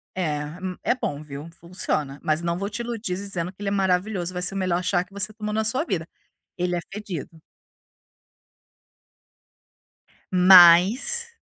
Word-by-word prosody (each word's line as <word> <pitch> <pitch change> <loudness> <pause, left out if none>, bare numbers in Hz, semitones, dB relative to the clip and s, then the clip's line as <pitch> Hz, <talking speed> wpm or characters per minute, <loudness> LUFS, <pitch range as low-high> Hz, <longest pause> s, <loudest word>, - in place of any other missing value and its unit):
é 160 -5 -1 0.3
m 185 -1 -4
é 245 - +1
bom 145 - -4
viu, 145 +1 -9
funciona, 155 -5 -3
mas 155 -1 0
não 170 0 -1
vou 200 +2 -3
te 210 - -6
iludir 230 -5 -4
dizendo 185 -3 -4
que 195 - -18
ele 205 - -4
é - - -3
maravilhoso, 190 -1 0
vai 180 - -4
ser 180 +2 0
o - - -2
melhor 180 -2 0
chá 180 -1 +1
que 185 - -26
você 200 +1 -2
tomou 210 -1 -5
na 220 0 0
sua 255 +7 +1
vida, 170 - -3 0.5
ele 180 0 -1
é - - -1
fedido. 180 -6 -7 2.9
Mas 190 - +6
185 Hz, 160 wpm, -24 LUFS, 170-205 Hz, 2.9 s, Mas